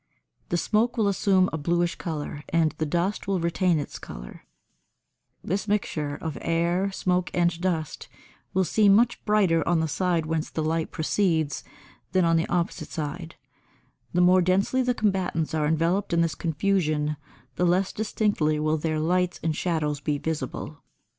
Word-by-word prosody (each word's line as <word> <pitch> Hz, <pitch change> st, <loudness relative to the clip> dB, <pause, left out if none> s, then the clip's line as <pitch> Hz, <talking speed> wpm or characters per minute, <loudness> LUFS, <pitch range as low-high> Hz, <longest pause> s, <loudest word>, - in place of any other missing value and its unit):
The 175 Hz, -, +1 dB
smoke 230 Hz, +7 st, +1 dB
will 215 Hz, -3 st, +2 dB
assume 190 Hz, -1 st, +3 dB
a 160 Hz, -, -2 dB
bluish 170 Hz, +3 st, +1 dB
colour, 150 Hz, -3 st, -5 dB
and 165 Hz, -2 st, +2 dB
the 155 Hz, -, 0 dB
dust 175 Hz, +7 st, -1 dB
will 195 Hz, -2 st, +1 dB
retain 170 Hz, +1 st, +1 dB
its 145 Hz, -, -5 dB
colour: -, -, -10 dB, 1.0 s
this 200 Hz, +4 st, -2 dB
mixture 155 Hz, -8 st, -1 dB
of 160 Hz, 0 st, -5 dB
air, 170 Hz, +4 st, +1 dB
smoke 180 Hz, -2 st, 0 dB
and 175 Hz, -1 st, +1 dB
dust 165 Hz, -5 st, -2 dB, 0.4 s
will 190 Hz, -, +2 dB
seem 200 Hz, +3 st, +4 dB
much 240 Hz, +2 st, +2 dB
brighter 195 Hz, -6 st, +3 dB
on 170 Hz, -1 st, +3 dB
the 160 Hz, -, 0 dB
side 170 Hz, +1 st, 0 dB
whence 160 Hz, 0 st, -2 dB
the 160 Hz, -, -3 dB
light 160 Hz, +1 st, -1 dB
proceeds 160 Hz, -3 st, 0 dB, 0.5 s
than 185 Hz, -2 st, +3 dB
on 165 Hz, 0 st, +3 dB
the 165 Hz, -, +1 dB
opposite 175 Hz, -1 st, -1 dB
side; 160 Hz, +2 st, -5 dB, 0.8 s
the 180 Hz, -, +2 dB
more 180 Hz, +1 st, +6 dB
densely 190 Hz, +8 st, +2 dB
the 250 Hz, -1 st, +1 dB
combatants 185 Hz, -7 st, 0 dB
are 155 Hz, -2 st, +1 dB
enveloped 170 Hz, +5 st, +1 dB
in 170 Hz, -, +3 dB
this 165 Hz, -2 st, +1 dB
confusion 155 Hz, -3 st, 0 dB, 0.4 s
the 180 Hz, -, +1 dB
less 185 Hz, +2 st, +1 dB
distinctly 205 Hz, -8 st, 0 dB
will 155 Hz, +1 st, +1 dB
their 155 Hz, 0 st, -1 dB
lights 180 Hz, +3 st, 0 dB
and 160 Hz, -1 st, 0 dB
shadows 155 Hz, -4 st, -1 dB
be 150 Hz, 0 st, -1 dB
visible. 155 Hz, -1 st, -4 dB
170 Hz, 160 wpm, -26 LUFS, 155-185 Hz, 1.0 s, more